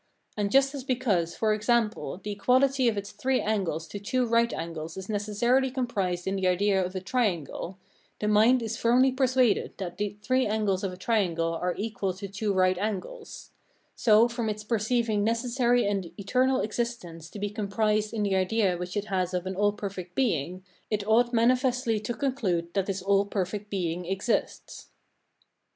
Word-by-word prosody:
And 205 -1 -1
just 275 +1 +4
as 275 -3 -5
because, 220 -11 0
for 215 -1 +1
example, 215 -2 0
the 210 - -4
equality 260 +5 +2
of 220 -3 +1
its 200 0 -4
three 255 +5 0
angles 185 -7 -1
to 205 - -6
two 250 +5 0
right 235 0 +2
angles 165 0 -5
is 190 +1 -7
necessarily 225 +6 +1
comprised 205 -9 -2
in 190 - -1
the 190 -1 +1
idea 190 +1 +2
of 180 +1 -5
a - - -1
triangle, 190 - -2 0.4
the 210 - -1
mind 225 +4 +4
is 225 0 -3
firmly 250 +3 +4
persuaded 255 -3 +1
that 180 -3 -6
the 205 0 -2
three 255 +3 +2
angles 205 -2 0
of 195 - -1
a 180 - -9
triangle 180 -5 0
are 180 +2 -2
equal 205 -3 -2
to 200 +1 -6
two 200 +2 -2
right 185 -1 +2
angles; 210 - -5 0.4
so, 225 0 +5
from 235 -2 -3
its 210 0 -4
perceiving 220 -1 0
necessary 240 +2 +1
and 195 -4 -2
eternal 255 +6 +2
existence 205 -8 -4
to - - -10
be 205 0 -3
comprised 210 0 0
in 220 -2 -2
the 200 -1 0
idea 190 -1 +1
which 180 +3 -5
it 205 - -1
has 185 -2 -1
of 180 0 -2
an 190 0 -3
all 205 +2 +3
perfect 190 -3 -7
Being, 185 - -1 0.3
it 210 -1 -2
ought 240 +2 +4
manifestly 245 -1 +2
to 225 +3 -4
conclude 195 -11 -1
that 195 -1 0
this 195 -2 -3
all 200 0 +3
perfect 200 +1 -3
Being 180 -3 -2
exists. 195 +6 -2
210 Hz, 175 wpm, -27 LUFS, 190-235 Hz, 0.4 s, so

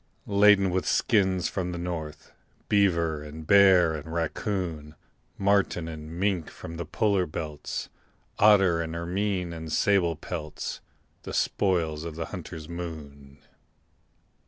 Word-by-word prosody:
Laden 100 -2 +5
with 90 +1 -1
skins 95 -7 +2
from 90 -2 -3
the 90 - -5
north, 80 -3 -6 0.4
Beaver 85 -7 +2
and 75 +1 -9
bear 95 -3 +6
and 80 +1 -6
raccoon, 85 -2 -3 0.4
Marten 100 -4 +1
and 80 -1 -7
mink 95 -5 0
from 80 +1 -9
the 85 -2 -5
polar 100 +1 +1
belts, 75 -1 -5 0.5
Otter 95 -5 +5
and 80 0 -4
ermine 90 +1 -2
and 80 -1 -7
sable 85 -1 +2
pelts 75 -1 -6 0.4
The - - -8
spoils 80 -6 0
of 85 -2 -6
the 80 0 -3
hunter's 85 -4 -7
moon. 75 -5 -8
85 Hz, 125 wpm, -27 LUFS, 80-95 Hz, 0.5 s, bear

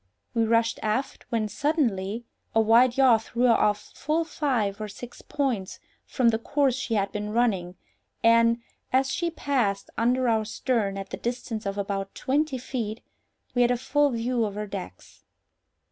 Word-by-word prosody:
We 230 -2 +2
rushed 230 0 +2
aft, 220 +5 -2
when, 225 -2 0
suddenly, 230 - -1 0.3
a - - +5
wide 235 +3 +5
yaw 255 -4 +6
threw 235 +2 -3
her 245 -2 +6
off 210 -1 +1
full 310 +3 0
five 245 -11 -1
or 215 - -3
six 240 +4 -10
points 250 -10 -2 0.3
from 250 -3 +3
the 225 -1 +1
course 280 +2 +1
she 250 -2 -2
had 200 -1 0
been 210 0 -4
running, 205 -6 0 0.5
and, 230 0 +5 0.3
as 265 +1 +2
she 345 -1 0
passed 245 -11 -1
under 250 +2 +2
our 220 -2 +2
stern 215 -3 -1
at 195 0 -7
the - - -4
distance 235 -3 -4
of 195 0 -3
about 195 -1 -3
twenty 285 +1 0
feet, 235 -3 -4 0.5
we 245 - +2
had 240 - +5
a 245 - +2
full 290 +4 +2
view 240 0 0
of 205 -2 -2
her 210 0 -3
decks. 195 - -9
230 Hz, 170 wpm, -26 LUFS, 210-255 Hz, 0.5 s, yaw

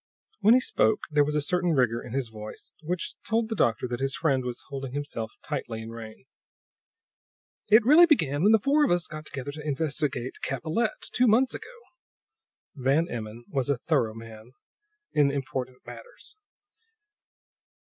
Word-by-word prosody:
When 220 +3 +6
he - - +6
spoke 110 - +1
there 150 -1 +4
was 150 +1 -2
a 150 - +1
certain 180 +1 +1
rigor 120 -4 +2
in - - -10
his 135 -3 -2
voice, 110 -1 -9
which 170 +2 -3
told 225 0 0
the 220 - -2
doctor 120 - +1
that 120 0 -4
his 135 0 -1
friend 135 -5 +1
was 125 -1 -5
holding 135 -2 -5
himself 135 -6 -4
tightly 115 -2 -4
in 115 - -8
rein. 115 -1 -10 1.4
"It 220 +2 +6
really 315 +7 +8
began 155 - +2
when 205 +4 +5
the 220 - +7
four 280 +7 +3
of - - +3
us 175 0 +2
got 155 -1 -7
together 135 +1 -5
to 150 +1 -8
investigate 145 -4 -2
Capellette, 160 - -2
two 250 0 +3
months 245 +4 +4
ago." 470 +2 -9 0.9
Van 140 +5 +1
Emmon 115 0 -6
was 135 0 -2
a 140 - +2
thorough 120 -5 0
man 115 +1 -11 0.6
in 145 -2 +4
important 130 -2 -4
matters. 480 -3 -12
145 Hz, 165 wpm, -27 LUFS, 125-180 Hz, 1.4 s, really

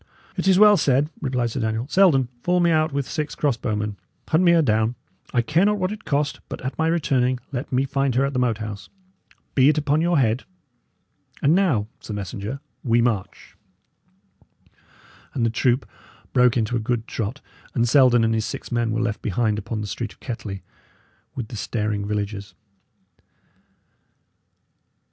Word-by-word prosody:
"It - - -2
is 190 -1 +5
well 210 0 +7
said," 145 0 +2
replied 125 -4 -1
Sir 130 - -3
Daniel. 110 +2 -1
"Selden, 160 -8 +4
fall 180 +4 +2
me 170 -1 +3
out 155 0 +2
with 140 -1 -2
six 150 -2 -3
cross 145 -5 +1
bowmen; 105 -3 -3 0.3
hunt 160 +3 +3
me 175 - +6
her 165 -1 +4
down. 110 -1 +1 0.4
I 120 - +2
care 155 +8 +2
not 210 +1 +3
what 185 0 -1
it 215 0 -8
cost; 145 0 0
but, - - -6
at 130 - -3
my 160 - +1
returning, 130 -6 +1
let 130 +1 -4
me 130 +1 +2
find 135 -2 0
her 135 +2 +3
at 140 - -3
the 125 - 0
Moat 120 -4 +1
House. 105 -2 -7 0.6
Be 135 +1 +5
it 155 - +2
upon 150 +1 +2
your 170 0 +2
head. 120 -1 +2 1.0
And 145 - +5
now, 170 - +2
sir 105 - -7
messenger, 100 +6 -5 0.2
we 120 -2 +3
march." 115 -5 -2 1.8
And 120 -4 +1
the 115 - +1
troop 125 +2 +1 0.5
broke 125 -1 +4
into 115 +1 0
a - - +1
good 115 0 -2
trot, 115 +5 -4 0.4
and 120 -2 +2
Selden 120 -2 +5
and 115 0 +2
his 110 -1 0
six - - -7
men 120 -1 0
were 115 +1 0
left 115 -3 -2
behind 105 +1 0
upon 110 +1 -4
the - - -3
street 105 +1 -5
of - - -29
Kettley, 105 -6 -6 0.7
with 120 -4 -5
the - - -7
staring 105 -1 -2
villagers. 100 -2 -4
125 Hz, 175 wpm, -23 LUFS, 110-145 Hz, 1.8 s, well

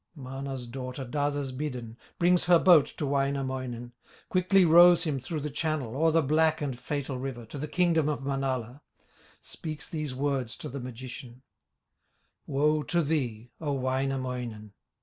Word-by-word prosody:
Mana's 135 -2 -6
daughter 130 +2 -6
does 145 +3 -1
as 140 -2 -3
bidden, 125 -5 -5 0.2
Brings 175 +1 +3
her 175 -1 +7
boat 165 -4 +6
to 150 - -1
Wainamoinen, 130 -3 -2 0.4
Quickly 185 +1 +4
rows 175 +1 +7
him 150 -5 -1
through 150 +4 -4
the 150 +1 -4
channel, 150 -5 -2
O'er 160 +3 +3
the 160 0 +3
black 155 +2 +3
and 140 -4 -2
fatal 140 -2 -3
river, 125 -3 -5
To 140 +6 -8
the 150 - -3
kingdom 165 -2 +2
of 145 -2 -2
Manala, 135 -2 -2 0.6
Speaks 155 -2 -6
these 150 -5 -4
words 135 -3 -1
to - - -6
the 140 - -5
magician: 125 0 -9 1.0
"Woe 150 +2 +2
to 170 +5 0
thee! 120 -7 -2
O 145 -3 -1
Wainamoinen! 130 -5 -2
140 Hz, 150 wpm, -28 LUFS, 130-155 Hz, 1.0 s, her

